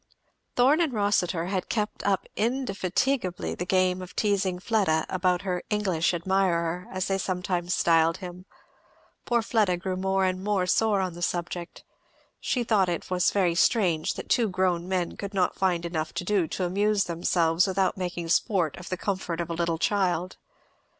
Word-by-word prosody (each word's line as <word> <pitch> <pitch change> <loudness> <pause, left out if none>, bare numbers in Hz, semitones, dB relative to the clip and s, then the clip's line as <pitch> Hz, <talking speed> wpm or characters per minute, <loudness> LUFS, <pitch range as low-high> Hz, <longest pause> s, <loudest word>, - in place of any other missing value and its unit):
Thorn 275 +7 +4
and 320 -5 +1
Rossitur 195 -5 +1
had 185 0 -3
kept 210 -2 -2
up 195 -2 +1
indefatigably 230 -3 -1
the 180 - -5
game 185 -1 +2
of 185 0 -10
teasing 200 -3 +1
Fleda 190 -5 +1
about 180 0 +1
her 180 -2 -2
"English 190 -6 +1
admirer," 180 -1 0
as 185 -1 -2
they 195 0 0
sometimes 180 -1 -1
styled 165 0 +3
him. 180 0 -9 0.8
Poor 235 -1 +1
Fleda 210 -6 +2
grew 185 +1 -3
more 190 +1 +1
and 185 0 -1
more 200 -3 +1
sore 205 +2 +2
on 185 -2 -2
the 175 - -10
subject. 175 0 -3 0.6
She 245 - -1
thought 205 -5 +2
it 175 +1 -4
was 180 -1 +3
very 185 -4 +2
strange 175 -3 +2
that - - -7
two 230 -3 +2
grown 185 -2 0
men 185 -2 -2
could 200 0 -6
not 185 -2 +2
find 175 -3 0
enough 160 -2 -3
to - - -2
do 190 -3 +1
to 185 - -3
amuse 200 +3 +1
themselves 170 0 +1
without 190 0 +1
making 175 -2 -4
sport 175 - +1
of 175 - -9
the 185 - -2
comfort 185 -3 -3
of 170 -1 -3
a - - -1
little 170 0 -1
child. 185 -1 0
185 Hz, 170 wpm, -26 LUFS, 175-200 Hz, 0.8 s, Thorn